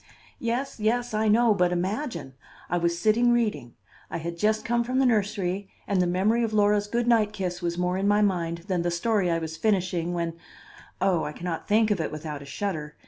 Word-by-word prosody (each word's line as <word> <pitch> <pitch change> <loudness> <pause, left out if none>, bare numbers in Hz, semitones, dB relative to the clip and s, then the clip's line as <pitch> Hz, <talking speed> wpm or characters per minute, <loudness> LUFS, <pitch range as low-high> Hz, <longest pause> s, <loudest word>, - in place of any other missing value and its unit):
"Yes, 240 +2 -2
yes, 240 +2 0
I 215 +1 +1
know; 225 +1 +5
but 180 -3 +2
imagine! 180 - -3 0.4
I 175 - +2
was 170 0 0
sitting 220 +6 +3
reading. 210 - 0 0.3
I - - -3
had 170 +1 -5
just 215 +5 +1
come 235 0 +1
from 255 +2 -2
the 265 - +4
nursery, 200 -4 0 0.2
and 195 -2 +1
the 180 - +2
memory 205 +7 +2
of 220 -1 -1
Laura's 205 0 +3
good 235 +3 0
night 220 -3 +3
kiss 180 -3 -3
was 170 0 -2
more 180 +1 0
in 195 - 0
my 205 +1 +4
mind 170 -4 -1
than 185 -3 0
the 175 - 0
story 185 +2 +1
I 165 - +2
was 160 -1 -5
finishing 180 -3 0
when 170 -1 -2 0.6
oh, 185 -3 +2
I 150 - -4
can 175 - -9
not 165 -2 -3
think 215 +1 +3
of 195 -5 +1
it 160 - -3
without 150 -1 -6
a - - -10
shudder! 150 -1 -4
195 Hz, 215 wpm, -26 LUFS, 170-220 Hz, 0.6 s, know